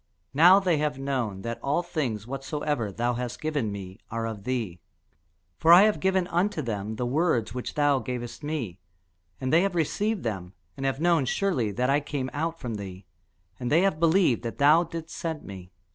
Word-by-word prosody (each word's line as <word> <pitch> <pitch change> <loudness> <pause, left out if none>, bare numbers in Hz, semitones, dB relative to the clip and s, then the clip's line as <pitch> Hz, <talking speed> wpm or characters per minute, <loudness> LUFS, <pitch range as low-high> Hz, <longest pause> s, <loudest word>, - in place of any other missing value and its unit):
Now 175 +7 +7
they 180 -5 +1
have 150 -2 -1
known 125 -8 -2
that 115 0 -4
all 145 +5 0
things 130 - -3
whatsoever 135 -3 -3
thou 120 +5 -1
hast 125 0 -4
given 145 -9 -1
me 95 -1 -8
are 115 0 -3
of 110 -3 -6
thee. 115 -9 -2 0.8
For 165 - +5
I 175 +3 +10
have 215 0 +3
given 190 -1 +2
unto 175 -2 0
them 110 -2 -3
the 125 - -2
words 125 -5 +1
which 125 -1 -5
thou 145 -2 +3
gavest 120 -1 -5
me; 130 - -4 0.6
and 130 +3 -2
they 165 - +6
have 195 -1 0
received 205 +6 0
them, 95 -5 -4 0.2
and 135 0 -2
have 135 0 -1
known 165 -4 +3
surely 130 - 0
that 125 +6 +1
I 145 - +4
came 145 -3 -4
out 165 +3 -2
from 120 -5 -4
thee, 95 -1 -8 0.5
and 125 +1 -3
they 160 +4 +5
have 195 -6 +1
believed 165 - +3
that 115 -1 -5
thou 150 +4 +6
didst 165 -1 -7
send 160 -3 -4
me. 95 -2 -10
135 Hz, 190 wpm, -27 LUFS, 115-165 Hz, 0.8 s, I